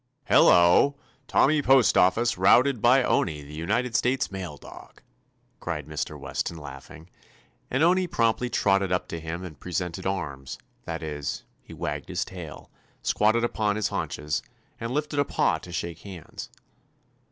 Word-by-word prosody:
"Hello! 90 +11 +5 0.3
Tommy 150 +1 +3
Postoffice 120 -4 +4
routed 120 +6 +4
by 125 +2 +5
Owney, 75 -10 0
the 70 +1 -12
United 110 +10 -1
States 130 -1 +1
Mail 90 -6 -6
dog!" - - -14 0.6
cried 75 -5 -4
Mr. 75 -1 -5
Weston, 85 - -4
laughing, 75 +2 -11 0.6
and 135 +4 +1
Owney 180 +2 +3
promptly 115 -3 +1
trotted 95 -4 +2
up 90 - 0
to 85 - -4
him 80 +3 -5
and 80 -6 -9
"presented 90 0 -3
arms"; 75 -9 -4 0.3
that 80 0 -5
is, 75 -2 -4 0.2
he - - -16
wagged - - -4
his - - -2
tail, 85 -6 -10 0.3
squatted 110 +3 +2
upon 110 -3 0
his 110 - 0
haunches, 75 0 -3 0.4
and 115 - -4
lifted 150 +1 -1
a - - +5
paw - - +1
to 90 - -11
shake 85 -2 -4
hands. 95 -6 -9
95 Hz, 145 wpm, -26 LUFS, 80-120 Hz, 0.6 s, Hello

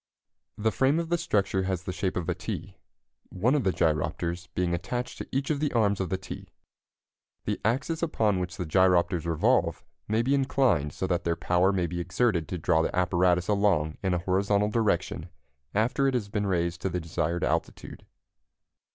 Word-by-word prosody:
The 110 +1 +1
frame 135 +6 +2
of 165 -1 -3
the 175 - +2
structure 100 - +1
has 95 -2 -2
the 90 - -4
shape 90 +1 -2
of 85 -2 -3
a 90 - +1
T, 95 0 -6 0.5
one 115 +9 +1
of 145 -4 +2
the 95 - +2
gyropters 85 +2 -1
being 90 -1 0
attached 120 +8 -3
to - - -5
each 135 +2 -1
of 145 - 0
the 150 -1 0
arms 105 -4 +2
of 95 -3 -2
the 95 - 0
T. 95 - -8 1.0
The - - -2
axes 135 +9 0
upon 110 - +1
which 90 -1 -4
the 90 - -3
gyropters 90 0 +3
revolve 85 +1 +1 0.2
may 110 +2 +1
be 135 +3 +1
inclined 130 - +2
so - - -3
that 90 -1 0
their 85 -1 0
power 90 +3 +2
may 90 -3 0
be 85 +1 -4
exerted 90 -1 0
to 90 - -4
draw 80 0 +2
the 80 - -1
apparatus 90 0 +2
along 100 -7 +1
in 95 -2 +1
a - - +1
horizontal 100 +3 +1
direction 90 -6 0 0.5
after 120 +6 +2
it 135 - +1
has 105 -5 -2
been 100 0 -1
raised 85 -2 -1
to 95 - -1
the 90 0 -2
desired 85 +1 -2
altitude. - - -3
95 Hz, 190 wpm, -27 LUFS, 85-110 Hz, 1.0 s, gyropters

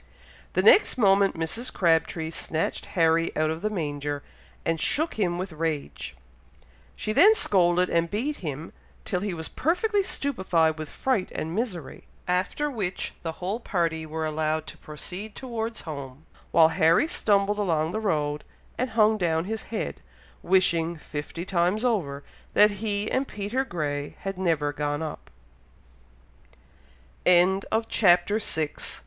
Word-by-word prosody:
The 185 - +2
next 315 - +6
moment 195 -3 +4
Mrs. 225 +10 -2
Crabtree 165 -2 +1
snatched 165 -1 -2
Harry 165 0 +3
out 155 0 +2
of 160 +1 -5
the 215 - 0
manger, 145 -6 -3 0.4
and 165 -1 0
shook 315 +3 +2
him 180 -5 0
with 185 +1 -4
rage. 155 - -3 0.8
She 215 - -3
then 420 - +7
scolded 180 - +3
and 170 0 +1
beat 255 - -2
him, 155 -2 -6 0.3
till 180 - -1
he 200 -2 -3
was 160 -1 -3
perfectly 400 +7 +1
stupified 180 - +1
with 155 -2 -5
fright 235 -9 -1
and 160 +1 -3
misery, 190 - -4 0.2
after 185 +11 0
which 205 -10 -3
the 165 -1 -4
whole 190 +7 -3
party 165 -7 -1
were 160 +1 -3
allowed 155 0 -1
to - - -10
proceed 180 +7 -7
towards 230 -3 -4
home, 140 -2 -8 0.2
while 160 -1 +6
Harry 165 - +3
stumbled 205 - +2
along 160 -5 +1
the 215 - -2
road, 150 -8 -1 0.4
and 255 +1 0
hung 215 0 +4
down 165 -2 +1
his 220 +2 -3
head, 225 - -4 0.4
wishing, 170 -3 +2
fifty 150 +3 -6
times 185 +5 +1
over, 150 - -1 0.3
that 210 0 +7
he 210 -1 -1
and 265 +1 0
Peter 210 +6 -2
Grey 145 - -3
had 195 0 -3
never 160 -5 +1
gone 145 +1 -2
up 155 - -7 1.9
THE 180 -1 +6
LONG 190 +2 +2
LADDER. 225 0 +1
CHAPTER 180 +1 +3
VII. 155 -7 -2
175 Hz, 145 wpm, -26 LUFS, 160-210 Hz, 1.9 s, then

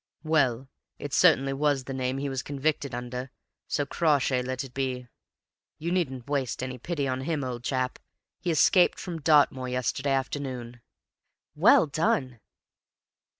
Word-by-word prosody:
"Well, 135 -6 +1 0.3
it 145 - -6
was - - 0
certainly 135 -6 +4
the 135 -2 0
name 130 0 -2
he 140 +1 -2
was 135 -2 -2
convicted 140 -2 -2
under, 125 +1 -5 0.4
so 145 - 0
Crawshay 140 -5 +1
let 130 +1 -3
it 130 -2 -11
be. 130 -2 -3 0.7
You 170 +2 -3
needn't 135 -9 -1
waste 135 -4 -2
any 130 -1 -5
pity 145 0 -2
on 130 0 -2
HIM, 150 0 -2
old 125 -2 -5
chap; 130 -1 -1 0.4
he 180 - -3
escaped 175 +3 +4
from 170 -3 -6
Dartmoor 140 -4 +3
yesterday 125 +3 -1
afternoon." 130 -3 -4 0.7
"Well - - +6
done!" 140 -5 0
135 Hz, 145 wpm, -27 LUFS, 125-145 Hz, 0.7 s, Well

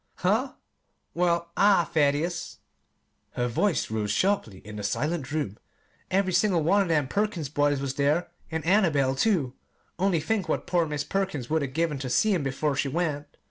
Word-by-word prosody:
"Huh? 220 +9 0 0.6
Well, 170 -1 0
I 200 -3 +5
Thaddeus," 160 +3 0 0.8
her 120 - -1
voice 155 - 0
rose 110 -2 -1
sharply 115 - 0
in 105 0 -8
the 105 - -5
silent 145 - -2
room, 145 -10 -3 0.5
"every 190 -1 +1
single 180 -6 +2
one 200 +6 +4
of 195 - 0
them 150 -5 +1
Perkins 200 -5 -1
boys 145 0 +1
was 135 -1 -2
there, 145 +5 +1 0.2
and 160 -1 -4
Annabel, 160 -9 +3
too. 140 - +1 0.5
Only 190 -3 +2
think 200 +5 -1
what - - -1
poor 175 -2 +1
Mis' 150 -1 -2
Perkins 150 -6 -3
would 160 0 +2
'a' 140 - -1
given 150 +1 -1
ter 130 -1 -4
seen 210 - +3
'em 135 - -1
'fore 145 +1 -1
she 140 - 0
went! 150 -1 -2
160 Hz, 175 wpm, -26 LUFS, 140-185 Hz, 0.8 s, I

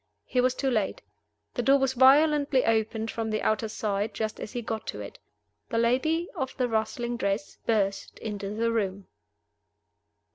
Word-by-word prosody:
He 250 - +1
was 255 0 +2
too 270 0 0
late. 215 -5 -1 0.5
The - - -1
door 270 +4 +5
was 270 -1 +1
violently 280 +1 +5
opened 220 0 0
from 225 -1 -3
the 215 0 -1
outer 215 0 +1
side, 210 -1 -2
just 220 -1 -3
as - - -6
he 240 -2 -3
got 220 0 -4
to - - -4
it. - - -8 0.5
The 230 - -1
lady 290 +9 +2
of 265 -1 -4
the 250 - +1
rustling 235 +2 -1
dress 200 -1 -2
burst 200 -3 0
into 205 -2 -5
the 230 +1 +1
room. 200 -3 -1
230 Hz, 170 wpm, -27 LUFS, 215-255 Hz, 0.5 s, door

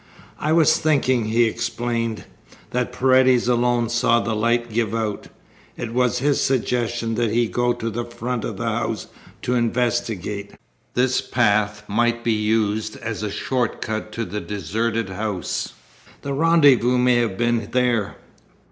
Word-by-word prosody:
"I 150 - -1
was 160 -2 +4
thinking," 130 -6 +2
he 115 +2 +3
explained, 115 0 -2 0.5
"that 125 0 -1
Paredes 130 -1 +3
alone 120 -1 +2
saw 120 0 +3
the 110 +1 -2
light 120 +1 0
give 115 -1 0
out. 110 -2 -3 0.5
It 115 -1 -5
was 125 0 +2
his 140 +3 +1
suggestion 120 -3 0
that 115 0 0
he 115 +2 +1
go 120 +2 +1
to 115 - -5
the 115 +2 -3
front 120 0 -4
of - - -4
the - - -4
house - - -2 0.4
to 125 - 0
investigate. 115 -4 -1 0.4
This 125 +1 +2
path 110 -4 +1
might 120 +2 +1
be 115 - +2
used 110 0 0
as 115 -1 -5
a 105 - -2
short 120 +4 -2
cut 110 0 -4
to 115 - -3
the 105 +3 -5
deserted 110 +3 -2
house. 95 -2 -3 0.5
The 140 - -3
rendezvous 140 -5 +4
may 125 0 +4
have 115 -5 0
been 120 -2 0
there." 125 -4 +1
120 Hz, 150 wpm, -22 LUFS, 110-125 Hz, 0.5 s, was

